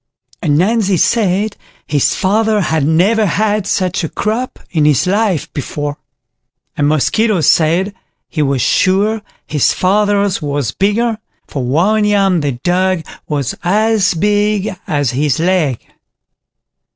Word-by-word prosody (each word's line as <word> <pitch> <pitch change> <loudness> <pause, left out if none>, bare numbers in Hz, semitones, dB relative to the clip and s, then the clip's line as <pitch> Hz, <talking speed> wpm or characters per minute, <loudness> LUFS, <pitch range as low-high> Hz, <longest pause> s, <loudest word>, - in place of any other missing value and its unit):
Ananzi 190 +6 +1
said 205 0 +1 0.3
his 145 -3 +1
father 215 +2 +1
had 160 -5 0
never 200 +7 +2
had 210 +1 0
such 185 -1 -1
a 160 - -2
crop 230 +4 -3
in 160 -4 +1
his 150 +2 +3
life 195 -3 0
before; 145 +1 -4 0.8
and 145 - +1
Mosquito 195 +8 +1
said, 170 +6 +2 0.3
he 155 - -3
was 135 -4 0
sure 205 +4 +2 0.2
his 150 -3 +1
father's 200 0 +1
was 145 -6 -2
bigger, 215 - 0 0.3
for 135 - -5
one 180 - +2
yam 195 -3 +2
they 145 -2 -1
dug 185 -1 +1 0.2
was 145 -4 -2
as 210 +1 +2
big 205 +2 +1 0.2
as 145 -7 0
his 140 +1 0
leg. 165 -8 0
185 Hz, 125 wpm, -15 LUFS, 150-210 Hz, 0.8 s, his